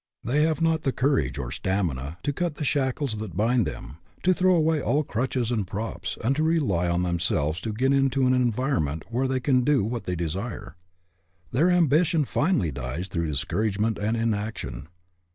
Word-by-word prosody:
They 140 +6 +1
have 160 +1 +1
not 160 -1 +2
the 135 - 0
courage 125 - +1
or 65 -3 -4
stamina 80 -4 -2
to 145 +1 0
cut 170 +1 -2
the 150 - -4
shackles 135 -3 0
that 105 -5 -6
bind 115 +1 +2
them, 65 +4 -7 0.3
to 185 - +4
throw 185 0 +3
away, 160 -2 +2
all 150 +3 +1
crutches 125 -1 -1
and 105 -6 -1
props, 95 -2 -4
and 130 +5 +2
to - - +1
rely 135 - +1
on 85 +1 +1
them 85 -1 -1
selves 80 -1 0
to 110 - -3
get 130 +6 +1
into 135 -1 +2
an 130 - +4
environment 120 - 0
where 130 +3 +1
they 130 0 0
can 130 -1 +2
do 135 -2 +3
what 115 0 -3
they 90 - -2
desire. 90 +8 -4 0.8
Their 155 +9 +3
ambition 165 -2 +3
finally 145 - +1
dies 70 +7 -5
through 85 -2 -1
discouragement 105 - -1
and 110 +3 0
in 115 -1 +1
action. 105 - -5
115 Hz, 190 wpm, -25 LUFS, 90-140 Hz, 0.8 s, to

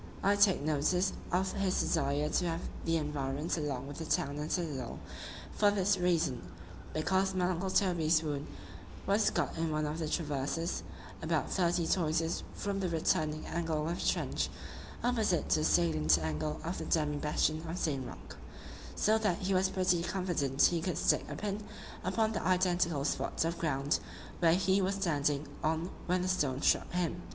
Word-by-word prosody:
—I 200 +1 +4
take 200 -4 +4
notice 155 +5 +1 0.2
of 185 +1 +1
his 195 -2 0
desire 145 -1 +1
to 175 - +1
have 165 +1 -2 0.2
the 165 0 +2
environs 145 0 -2
along 145 -6 -3
with 145 +2 -8
the 160 - -4
town 150 -3 0
and 150 +1 -4
citadel, 145 -9 -2 0.5
for 205 - +3
this 205 0 +2
reason,—because 160 - -1
my 180 -1 +2
uncle 185 +1 -1
Toby's 170 -5 +2
wound 145 -1 -3 0.6
was 205 +2 +3
got - - -1
in 165 0 0
one 155 0 0
of 150 +2 -3
the 155 -2 -2
traverses, 150 +1 -1 0.4
about - - -1
thirty 175 -2 +1
toises 165 -1 +1
from 200 -1 -2
the 185 -2 -1
returning 155 -1 0
angle 160 -2 -1
of 170 +1 -2
the - - -3
trench, - - -1 0.5
opposite 220 -8 +1
to 155 - +3
the 155 - 0
salient 80 - +3
angle 80 - -2
of 170 +3 -3
the - - -4
demi 150 -2 +1
bastion 155 +1 0
of 170 - -3
St. 140 -7 -1
Roch:——so 215 +1 -3
that 210 -6 +1
he 195 +1 -1
was 185 0 +3
pretty 185 -2 +2
confident 170 -7 0
he 170 -2 +4
could 170 -2 -2
stick - - +2
a - - -4
pin 205 0 -3 0.4
upon 220 -1 +1
the 210 - -2
identical 175 -5 +1
spot 155 - -1
of 170 +1 -2
ground 145 -2 0 0.4
where 165 -1 +5
he 190 +1 +2
was 190 +1 0
standing 150 -6 0 0.2
on 160 +3 0 0.2
when 180 0 +1
the - - -1
stone 145 -8 0
struck - - +3
him. 175 -1 -1
165 Hz, 170 wpm, -32 LUFS, 150-185 Hz, 0.6 s, where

